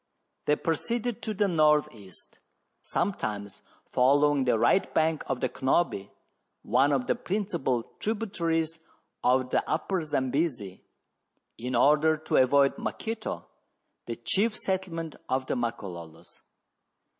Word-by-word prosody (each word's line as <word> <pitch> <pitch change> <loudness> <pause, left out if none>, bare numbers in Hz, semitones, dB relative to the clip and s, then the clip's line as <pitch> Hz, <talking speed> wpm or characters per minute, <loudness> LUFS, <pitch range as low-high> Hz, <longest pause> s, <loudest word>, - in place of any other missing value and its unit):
They 150 - +3
proceeded 235 +9 -2
to 215 -1 -2
the 205 +1 +2
north 155 -4 +3
east, 100 -5 -13 0.4
sometimes 105 - -3 0.2
following 140 +2 +3
the 120 -2 +3
right 120 - +3
bank 160 -1 +2
of 130 -2 -2
the - - +2
Cnobi, 130 - 0 0.5
one 140 +2 +3
of 135 -3 +1
the - - +2
principal 180 - -1 0.2
tributaries 165 -7 -1 0.4
of 130 0 +2
the - - +2
Upper 175 +3 0
Zambesi, 130 - -1 0.8
in 125 +2 -3
order 150 +5 +4
to 155 - -1
avoid 135 +2 +4
Maketo, 225 -1 -4 0.6
the - - -3
chief 215 +2 0
settle 190 -2 -2
ment 165 -2 -5
of 130 0 0
the - - -2
Makololos. 95 -9 -6
150 Hz, 120 wpm, -28 LUFS, 125-180 Hz, 0.8 s, order